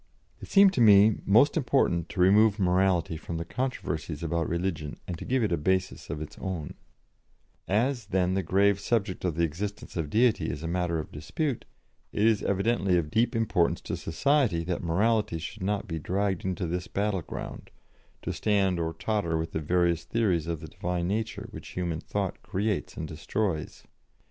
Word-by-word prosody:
It - - -8
seemed 195 -1 +6
to 125 - +1
me 105 -1 +7
most 120 +9 +5
important 125 - +1
to 90 - -7
remove 105 +3 +5
morality 90 -3 +2
from 80 +1 -5
the 85 - -4
controversies 80 - -3
about 85 0 -1
religion, 85 -4 -3
and 90 - -3
to - - -7
give 130 -1 +1
it 105 - 0
a 85 - +2
basis 95 +4 -1
of 75 +1 -3
its 75 - -11
own: 90 -6 -4 0.9
"As, 115 +2 0
then, 95 -2 +1
the 95 - +1
grave 100 +3 +3
subject 100 -3 -1
of 90 -4 0
the 85 - +1
existence 100 +6 -4
of 80 -4 -2
Deity 115 +3 +2
is 75 - -5
a - - -2
matter 85 -1 0
of 80 - -5
dispute, 120 - -3 0.5
it 105 - +1
is 110 -2 +3
evidently 100 -2 +1
of 75 -3 -2
deep 120 +2 +2
importance 105 -7 +1
to - - -4
society 115 - +1
that 90 +1 -2
morality 100 +2 +1
should 90 +6 -7
not 105 +3 -1
be 80 -3 -3
dragged 95 +3 -1
into 95 -1 -2
this 90 +2 -3
battlefield, 100 -4 -3 0.5
to - - -2
stand 100 -4 +1
or 80 0 -1
totter 100 -7 -1
with 80 0 -3
the - - -2
various 85 +1 +1
theories 95 -8 0
of 85 -2 -3
the - - -7
Divine 90 -1 -3
nature 110 +1 -2
which - - -9
human 85 -3 -1
thought 100 +2 -3
creates 105 +1 -2
and 80 - -4
destroys. 80 +2 -3
95 Hz, 180 wpm, -28 LUFS, 85-105 Hz, 0.9 s, me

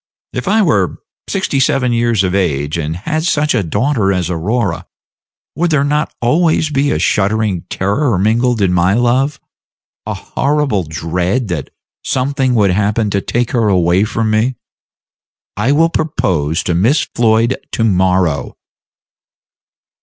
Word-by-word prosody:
If 125 - -4
I 215 +2 +3
were 100 - +1 0.3
sixty 190 -8 -1
seven 130 -2 +1
years 115 -3 +1
of 90 -1 -1
age, 75 -6 0
and 80 -1 -3
had 155 - -3
such 150 -3 +1
a 120 - +1
daughter 100 - 0
as 90 -2 -1
Aurora, 95 +2 -2 0.7
would 175 +2 0
there 150 -3 +2
not 150 +1 0
always 155 +5 +1
be 140 0 +1
a - - 0
shuddering 105 -3 0
terror 105 +4 0
mingled 115 +4 +1
with 95 -2 +2
my 90 +2 +2
love 130 +4 +1 0.7
a - - -3
horrible 140 - -1
dread 90 - -2
that 80 -5 -3 0.3
something 130 -1 0
would 100 -4 +3
happen 105 +2 0
to 100 - 0
take 120 +3 -1
her 115 -3 +1
away 90 -1 +3
from 110 0 -1
me? 115 +4 +1 1.0
I 105 +7 0
will 165 +3 +3
propose 90 - -1
to 90 - -1
Miss 115 - +2
Floyd 115 +1 +2 0.2
to 115 - 0
morrow." 90 - +1
110 Hz, 145 wpm, -15 LUFS, 95-135 Hz, 1.0 s, I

